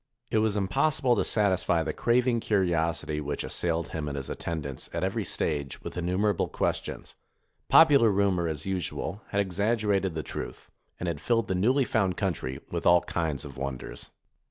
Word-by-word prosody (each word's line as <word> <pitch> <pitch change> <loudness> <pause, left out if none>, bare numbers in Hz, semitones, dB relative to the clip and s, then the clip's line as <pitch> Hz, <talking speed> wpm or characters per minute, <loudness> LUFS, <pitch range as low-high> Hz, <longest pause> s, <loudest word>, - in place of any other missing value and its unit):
It 110 - +3
was 110 -1 +1
impossible 125 +6 +2
to - - +1
satisfy 95 -5 +2
the 80 -1 -3
craving 120 0 +2
curiosity 85 -7 0
which 75 0 -3
assailed 85 -1 -2
him 75 -2 -4
and 70 -1 -4
his 70 - -5
attendants 75 -5 -5
at 85 +1 -2
every 100 +4 -1
stage 70 -7 -2
with - - -6
innumerable 90 +3 0
ques - - 0
tions; - - -8 0.5
popular 140 -8 +7
rumor, 95 -4 +2
as 75 -3 -4
usual, 95 +1 -3
had 100 - -1
exaggerated 100 -1 +1
the 80 - -2
truth, - - -7 0.3
and - - -3
had 85 -4 -3
filled 115 -2 +1
the - - 0
newly 125 +9 +3
found 95 -7 0
country 75 -10 -2
with - - -1
all 85 0 +6
kinds 80 -4 -2
of 70 -3 -10
wonders. 65 -1 -6
90 Hz, 170 wpm, -28 LUFS, 80-105 Hz, 0.5 s, popular